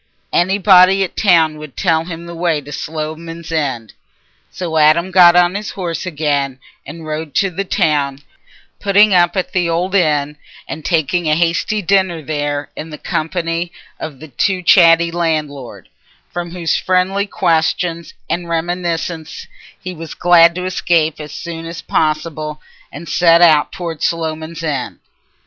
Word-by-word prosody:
Anybody 190 +1 +5
at 185 - -5
the - - -3
town 160 -6 +3
would 150 -3 -11
tell 165 -3 +1
him 170 -1 -7
the 170 - -8
way 165 -2 0
to 145 0 -12
Sloman's 160 +2 -6
End. 135 -9 -2 0.6
So 165 -3 -4
Adam 155 +4 +4
got 175 -2 +7
on 180 0 +4
his 205 +1 -4
horse 175 -2 -4
again 145 -5 -1 0.3
and 160 +3 -9
rode 155 -1 -5
to 195 -1 +2
the 195 +3 -3
town, 145 -7 0 0.6
putting 205 +1 +4
up 175 0 +3
at 185 - -2
the 175 -2 +1
old 175 +3 -1
inn 150 -5 +1 0.3
and 155 - -7
taking 165 0 0
a 155 - +3
hasty 170 +5 0
dinner 185 -3 +1
there 145 -1 -3
in 160 - -7
the 150 - -8
company 165 +2 -3 0.3
of 150 -4 -7
the 155 - -11
too 180 +8 -1
chatty 170 -2 +5
landlord, 155 -6 -3 0.5
from 175 -1 -4
whose 170 -1 -1
friendly 190 +2 0
questions 170 -2 -1
and 175 0 -3
reminiscences 170 -2 -3 0.3
he 185 - -6
was 165 -1 -9
glad 170 -1 +5
to 180 0 -4
escape 170 -4 0
as 150 -1 -8
soon 165 +2 -7
as 170 0 -8
possible 155 -1 -2 0.3
and 160 +4 -9
set 170 +2 +4
out 155 -3 +4
towards 165 -4 -4
Sloman's 160 0 -3
End. 145 -5 -3
165 Hz, 155 wpm, -17 LUFS, 155-175 Hz, 0.6 s, got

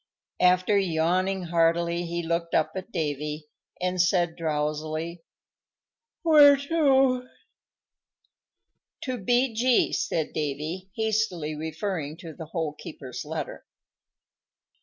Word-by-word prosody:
After 185 +3 +4
yawning 185 +2 +1
heartily 170 0 +1
he 170 0 -3
looked 170 0 -1
up 155 - +2
at 190 +4 -6
Davy, 150 -1 -3 0.3
and 180 0 +1
said 175 -2 +2
drowsily, 155 +2 -2 1.0
"Where 295 -4 +8
to?" 270 -4 +2 1.7
"To 255 -2 -3
B.G.," 245 +3 +2
said 160 -2 -1
Davy, 155 +5 -3
hastily 215 -8 -1
referring 160 0 -4
to 165 -2 -9
the 160 - -8
Hole 160 -2 -3
keeper's 135 -4 -8
letter. 155 -1 -5
170 Hz, 95 wpm, -26 LUFS, 155-205 Hz, 1.7 s, Where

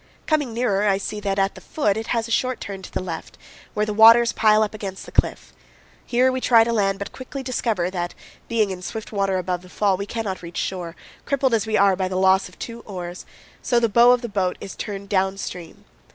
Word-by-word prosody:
Coming 295 -6 +1
nearer, 210 -3 +1
I 195 -1 +3
see 210 +2 -4
that 200 -1 -2
at 195 0 +1
the - - -12
foot 210 -10 0
it 220 +1 -4
has 230 -1 -1
a - - -8
short 255 +1 0
turn 195 -1 -7
to - - -10
the - - -3
left, 170 -3 -7 0.4
where 210 0 +1
the 215 - -3
waters 230 +2 +7
pile 215 -1 +4
up 210 - -3
against 195 -3 -6
the - - -11
cliff. - - 0 0.5
Here 250 +2 +2
we 255 0 -3
try 230 -3 +6
to 235 +1 -1
land, 195 -3 +1
but 200 - -6
quickly 265 +1 -7
discover 225 -8 -1
that, 175 -2 -4 0.3
being 220 -4 +1
in 180 -1 -6
swift 220 +4 -6
water 195 -2 0
above 180 -1 -2
the 180 - -15
fall, 195 0 +1
we 200 +1 -5
cannot 210 -5 -4
reach 170 -1 -9
shore, 175 -3 -3 0.3
crippled 270 -3 +1
as 220 -1 +1
we 215 - +1
are 200 -1 +4
by 185 0 -1
the 185 - -4
loss 190 0 +3
of 180 - -19
two 230 0 -7
oars; 180 -5 -8 0.3
so 240 - +2
the 235 - +2
bow 235 +3 +6
of 250 0 +2
the - - -2
boat 190 -4 -1
is 195 - -8
turned 200 -1 -6
down 195 -1 +1
stream. 175 -3 -8
205 Hz, 240 wpm, -22 LUFS, 190-230 Hz, 0.5 s, waters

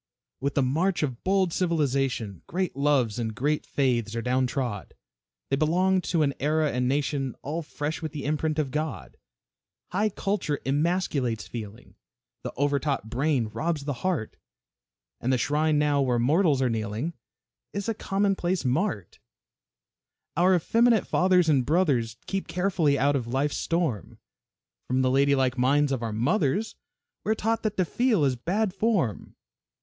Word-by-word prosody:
With 140 +1 -2
the 140 - +3
march 165 +8 +1
of 130 -5 -3
bold 190 -2 +2
civilization, 135 - 0
Great 185 -2 -2
loves 135 -6 +1
and 110 -2 -3
great 150 +5 -1
faiths 120 -5 0
are 115 - -1
down 125 +1 +1
trod, 120 -6 -4 0.6
They - - +4
belonged 180 +5 +2
to 165 -3 +2
an 140 -1 +1
era 155 +1 +1
and 125 0 0
nation 135 -1 -1
All 155 +4 -3
fresh 155 0 -4
with 160 -2 -4
the 145 -3 -6
imprint 155 +1 -1
of 145 -4 -1
God. 150 - -4 0.7
High 205 +4 +1
culture 195 -7 -2
emasculates 140 - 0
feeling, 110 0 -8 0.5
The - - -5
over 145 +1 +2
taught 140 -7 -2
brain 130 -3 +1
robs 150 +7 -2
the 145 - -1
heart, 175 -12 -2 0.8
And 125 - 0
the 130 - +3
shrine 150 +3 +1
now 145 -1 +2
where 125 -3 +1
mortals 145 +2 +3
are - - +3
kneeling 110 +8 -2 0.6
Is 200 -1 -4
a 225 - +1
commonplace 195 -5 0
mart. 130 - -1 1.2
Our 185 +2 +4
effeminate 230 +5 +3
fathers 180 -2 +3
and 140 -5 +3
brothers 130 -8 +1
Keep 195 -1 -3
carefully 175 -6 +1
out 140 +2 +2
of 125 -4 -2
life's 135 +4 0
storm, 165 - -2 0.7
From 130 +1 +1
the 130 - +2
ladylike 135 -2 +2
minds 140 +3 +3
of 130 -3 -1
our 115 -1 -2
mothers 145 - 0 0.5
We 220 - +2
are - - -6
taught 225 +1 0
that 215 -1 -2
to 185 - +2
feel 225 - +2
is 130 -2 +1
"bad 190 - -1
form." 195 - -1
145 Hz, 155 wpm, -26 LUFS, 130-175 Hz, 1.2 s, They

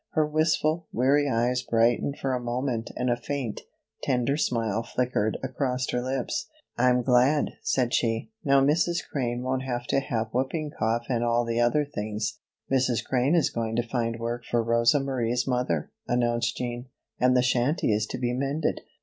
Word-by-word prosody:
Her 155 -2 +3
wistful, 155 +1 +1
weary 140 +4 +3
eyes 125 +1 +1
brightened 120 +4 +1
for 135 -1 -1
a 125 - 0
moment 120 -1 -2
and 125 - -1
a 120 - +3
faint, 125 -2 -4 0.4
tender 130 +1 +1
smile 115 -6 0
flickered 115 -2 -1
across 130 0 -1
her 125 - 0
lips. 130 0 -2 0.3
"I'm 125 0 +3
glad," 130 +4 +3
said 125 -2 0
she. 115 - 0
"Now 140 -2 +4
Mrs. 165 +5 +1
Crane 125 -3 -2
won't 130 0 -1
have 120 -2 -3
to - - +3
have 115 -5 -2
whooping 145 +4 -1
cough 115 0 -1
and 120 -3 0
all 120 0 +2
the 115 0 -1
other 145 +5 +3
things." 105 -4 -4 0.3
"Mrs. 130 -3 +1
Crane 130 +5 +2
is 165 -5 +2
going 115 -1 -2
to 120 - +1
find 115 -2 -1
work 120 +1 -3
for 120 -1 0
Rosa 115 +4 +3
Marie's 125 -3 -1
mother," 125 - -1 0.2
announced 120 -1 +1
Jean, 120 0 -4 0.3
"and 125 0 +4
the 125 - +4
shanty 125 0 +2
is 105 +1 0
to - - -4
be 120 -1 -1
mended." 140 +4 -1
125 Hz, 175 wpm, -26 LUFS, 120-135 Hz, 0.4 s, Now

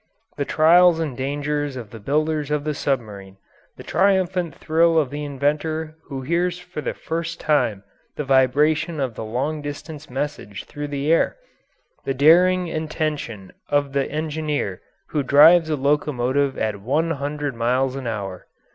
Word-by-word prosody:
The 140 - -2
trials 170 +3 +5
and 155 -6 -2
dangers 145 +1 -2
of 115 -5 -8
the 115 - -9
builders 150 +5 0
of 150 -1 0
the 155 0 -1
submarine; 105 -9 -3 0.4
the - - -10
triumphant 185 -1 +1
thrill 165 +1 +2
of 150 -5 +2
the 150 +1 -4
inventor 150 +3 -2
who 135 -2 -6
hears 175 +4 0
for 180 -3 -7
the - - -3
first 165 +1 -4
time 110 -10 +1 0.3
the 150 - -3
vibration 145 +4 +2
of 130 -4 -1
the 110 - -6
long 135 +8 -2
distance 145 +1 -8
message 130 -6 -4
through 145 0 -6
the 145 +2 0
air; 165 - +2 0.7
the 135 - -2
daring 180 +6 +5
and 155 -1 -4
tension 145 -11 -4 0.2
of 145 -1 +1
the 140 -1 0
engineer 150 - -2 0.3
who 150 - 0
drives 155 +5 +6
a 155 - +1
locomotive 140 -1 0
at 105 -2 -2
one 150 +9 0
hundred 145 -1 -3
miles 125 +3 0
an 135 -3 -5
hour. 100 -5 -5
145 Hz, 155 wpm, -22 LUFS, 130-160 Hz, 0.7 s, drives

